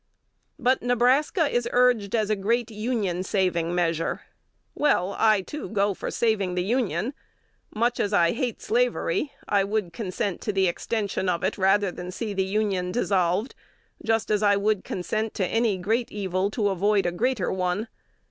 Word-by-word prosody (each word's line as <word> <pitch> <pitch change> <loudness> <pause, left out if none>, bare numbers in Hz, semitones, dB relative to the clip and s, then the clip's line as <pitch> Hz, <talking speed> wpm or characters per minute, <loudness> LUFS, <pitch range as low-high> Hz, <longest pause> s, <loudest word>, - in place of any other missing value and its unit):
"But 255 -2 +2
Nebraska 255 - +2
is 240 -3 -1
urged 245 -5 +3
as 215 -2 +1
a - - +3
great 230 +4 0
Union 210 -5 -1
saving 180 -3 0
measure. 165 -2 0 0.5
Well, 200 -10 +1
I, 215 -3 +4
too, 300 +10 -7
go 200 -1 +1
for - - -5
saving 205 -6 0
the 180 - 0
Union. 225 - -1 0.6
Much 235 +3 +1
as 205 - 0
I 170 -4 +4
hate 245 0 -3
slavery, 465 - 0 0.2
I 200 -1 +3
would 200 -3 -2
consent 200 -1 -3
to 210 - -1
the 190 -2 +2
extension 195 +1 -2
of 170 -2 -1
it, - - 0
rather 195 0 +2
than 180 0 -7
see 210 +3 -4
the 190 -1 +1
Union 190 -2 -1
dissolved, 190 +1 +1 0.5
just 225 -1 0
as 210 -1 +2
I 205 -1 +4
would 205 -1 +1
consent 215 +4 -3
to 190 - 0
any 225 0 +1
great 225 +6 -1
evil 190 -1 -1
to 210 -1 0
avoid 200 +2 +2
a 175 - +1
greater 225 +2 0
one. 185 +4 -1
205 Hz, 165 wpm, -25 LUFS, 185-230 Hz, 0.6 s, I